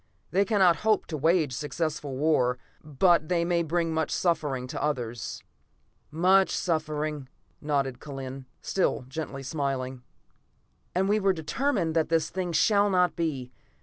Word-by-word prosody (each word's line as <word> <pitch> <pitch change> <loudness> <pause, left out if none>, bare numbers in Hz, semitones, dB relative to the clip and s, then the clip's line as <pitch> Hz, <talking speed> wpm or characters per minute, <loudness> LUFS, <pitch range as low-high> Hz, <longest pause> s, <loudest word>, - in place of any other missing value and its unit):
"They 195 +3 +3
cannot 190 -6 +4
hope 215 -1 +2
to 160 - -5
wage 160 -1 +2
successful 150 -1 -3
war, 130 -4 +2 0.3
but 155 +2 +2
they 170 -2 +2
may 170 0 +1
bring 165 0 0
much 160 0 0
suffering 145 -7 0
to 130 - -5
others." 120 -6 -3 0.7
"Much 185 +5 +4
suffering," 150 -4 -2 0.3
nodded 140 -4 -1
Kellen, 135 -2 -7 0.2
still 185 -8 0
gently 135 -1 -5
smiling. 135 -3 -3 0.9
"And 190 +2 +2
we 210 +2 +3
are 195 -1 +3
determined 170 - -1
that 160 -1 +2
this 165 -1 +1
thing 185 -1 -2
shall 205 +5 +3
not 180 -2 +2
be. 140 -7 -2
160 Hz, 140 wpm, -27 LUFS, 135-175 Hz, 0.9 s, cannot